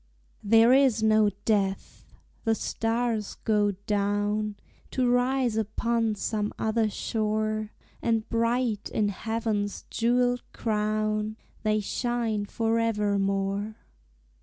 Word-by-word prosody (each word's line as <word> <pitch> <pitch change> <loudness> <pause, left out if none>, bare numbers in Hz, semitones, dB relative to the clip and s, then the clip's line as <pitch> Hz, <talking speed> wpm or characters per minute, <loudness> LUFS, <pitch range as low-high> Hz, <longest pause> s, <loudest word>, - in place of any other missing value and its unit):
There 225 +3 +6
is 260 -5 +4
no 215 -1 +5 0.2
death! 195 -3 -1 0.4
the 225 -1 +2
stars 225 -1 -1
go 210 -2 +2
down 205 +1 0 0.3
To 255 -1 0
rise 245 -1 +2
upon 225 +1 0
some 210 0 -2
other 220 0 +1
shore, 215 0 -1 0.3
And 225 -1 0
bright 230 -2 0
in 210 -1 +1
heaven's 215 -1 -2
jewelled 245 +1 +2
crown 215 0 -1 0.2
They 215 -1 +1
shine 230 -1 -1
forever 225 -3 +1
more. 195 +2 -1
215 Hz, 100 wpm, -27 LUFS, 210-230 Hz, 0.4 s, There